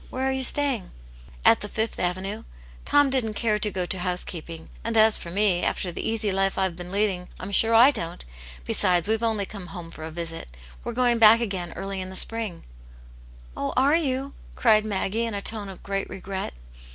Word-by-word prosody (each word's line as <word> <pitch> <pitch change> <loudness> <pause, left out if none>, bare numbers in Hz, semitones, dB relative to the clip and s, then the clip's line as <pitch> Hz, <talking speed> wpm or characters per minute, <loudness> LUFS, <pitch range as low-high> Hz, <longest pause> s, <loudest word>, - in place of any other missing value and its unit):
Where 260 +1 -2
are - - +1
you 265 0 -1
staying 265 -6 +2 0.2
?" - - -21
" - - -18
At - - +6
the 205 - -6
Fifth 220 +1 -3
Avenue. 190 +5 -2 0.4
Tom 290 -2 +4
didn't 230 -5 0
care 215 -2 0
to 210 - +2
go 185 -3 -2
to 185 +1 -1
housekeeping, 175 -2 -4
and 230 0 -1
as 220 0 +6
for 170 - -7
me, 190 -1 +1
after 180 - -1
the - - -5
easy 220 -2 0
life 195 0 0
I've 190 -3 0
been 175 +1 -8
leading, 195 -3 0
I'm 185 +2 -6
sure 225 +3 +4
I 245 +5 +8
don't 170 - -5 0.4
Besides, 175 - +2
we've 220 +1 0
only 220 -3 0
come 195 -2 -9
home 170 -1 -9
for 160 - -10
a 160 - -5
visit. 165 0 -6 0.4
We're - - -4
going 240 -1 +2
back 225 +1 +8
again 190 -7 -3
early 195 -1 -5
In 185 - -6
the 190 - -8
spring/' 220 -3 +2 0.5
" - - -21
Oh, 140 - -3
are 275 +3 +4
you 275 -3 -1
?" - - -20
cried 215 -3 +4
Maggie, 210 +3 -1
in 225 - -4
a - - -2
tone 210 -1 -2
of 190 - -11
great 195 0 -3
regret. 190 - -5
200 Hz, 215 wpm, -25 LUFS, 180-225 Hz, 0.5 s, I